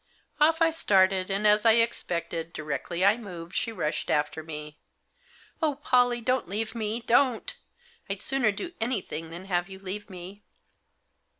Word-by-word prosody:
Off 325 +2 +5
I 325 - +4
started; 190 - +3
and, 195 +2 -1
as 210 0 +5
I 225 - +7
expected, 170 -7 -1
directly 155 +4 -2
I 205 +3 +5
moved, 175 -7 -9
she 230 - 0
rushed 155 -8 -2
after 150 +1 0
me. 150 -1 -8 0.4
" 485 -6 -29
Oh, 305 -3 +2
Pollie, 245 -4 +2
don't 255 -3 0
leave 220 +3 -2
me, 225 0 -2
don't. 240 +1 +2 0.5
I'd 195 -1 -3
sooner 270 -5 +2
do 345 - -6
anything 200 -9 -2
than 170 +3 -8
have 175 -1 -1
you 190 - -8
leave 195 +2 -6
me." 185 +2 -10
205 Hz, 160 wpm, -27 LUFS, 175-235 Hz, 0.5 s, I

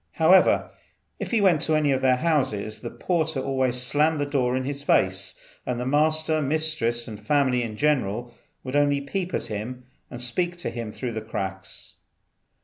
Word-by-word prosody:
However, - - +4 0.5
if - - -4
he 230 -3 +2
went 175 -7 +4
to 160 -1 +1
any 150 -2 +2
of 130 -1 +1
their 130 -1 +4
houses 125 -9 0
the 120 - -5
porter 160 -3 -1
always 130 -2 0
slammed 150 +5 +2
the 145 - +1
door 130 -3 0
in 130 - -2
his 140 +1 -4
face, 95 -7 +1 0.3
and 125 -1 -3
the 125 - -3
master, 155 +3 +2
mistress, 145 -5 0
and 105 -2 -7
family, 130 +2 +2
in 110 -3 -5
general, 120 -5 0 0.3
would 130 +1 -5
only 145 -1 +3
peep 175 +6 -3
at, - - -4
and 110 +5 -4 0.4
speak 175 +9 -1
to 175 - -3
him 115 -3 -5
through 125 +2 -4
the 110 - -3
cracks. 95 -3 -6
130 Hz, 175 wpm, -25 LUFS, 120-155 Hz, 0.5 s, However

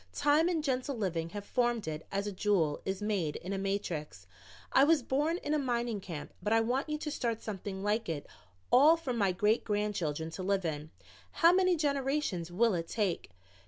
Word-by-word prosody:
"Time 295 +4 +3
and 325 -4 0
gentle 265 -1 -1
living 170 -6 -2
have 205 +3 -7
formed 240 -5 0
it 155 0 -5
as 200 +1 -1
a 205 - -2
jewel 185 -6 +1
is 190 +1 -3
made 190 -8 -1
in 185 +3 -5
a - - -1
matrix. 195 -6 -3 0.5
I 270 - +6
was 300 -2 +4
born 295 +7 +1
in 300 - -3
a 305 - +2
mining 240 -5 -1
camp, 165 -5 -7
but 210 - -2
I 225 - +5
want 250 +6 0
you 300 - -1
to 300 0 -4
start 235 -6 -2
something 195 -2 -5
like 210 0 0
it 150 -3 -3 0.5
all 295 +6 +7
for 285 -6 -3
my 200 -5 +2
great 210 +5 +2
grandchildren 185 -7 -2
to 185 - -6
live 190 0 0
in. 155 -1 -3 0.4
How 335 +1 +5
many 365 -1 +4
generations 275 - -1
will 225 +4 +3
it 165 -2 -2
take?" 200 -6 -1
210 Hz, 195 wpm, -31 LUFS, 185-270 Hz, 0.5 s, all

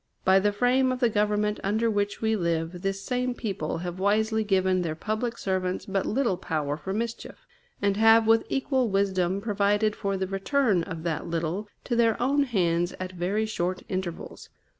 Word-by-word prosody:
By 190 +1 +6
the 205 +2 +2
frame 250 +5 +2
of 255 - -2
the 240 -3 +2
Government 210 0 +1
under 220 +4 +1
which 205 -1 -1
we 220 0 +2
live, 170 -1 -2
this 195 0 -2
same 250 +2 -1
people 195 -11 -3
have 175 +1 -5
wisely 220 +3 +2
given 190 -2 +2
their 160 -3 -2
public 220 +6 -3
servants 185 -1 -2
but 195 -1 -1
little 230 -5 +1
power 155 -5 -2
for 160 +5 -6
mischief, 230 +3 -5 0.4
and 200 0 +2
have 225 +1 +6
with 225 0 +4
equal 265 -3 0
wisdom 195 -1 +1
provided 205 0 +1
for 195 -2 -2
the 190 - -1
return 195 +1 +1
of 165 -2 -6
that 165 -3 -2
little 170 +5 -2 0.2
to 240 - -2
their 230 -2 +3
own 280 +3 +2
hands 175 -7 0
at 185 0 -4
very 185 +5 -1
short 185 -4 -2
intervals. 185 -3 -5
200 Hz, 180 wpm, -26 LUFS, 185-225 Hz, 0.4 s, By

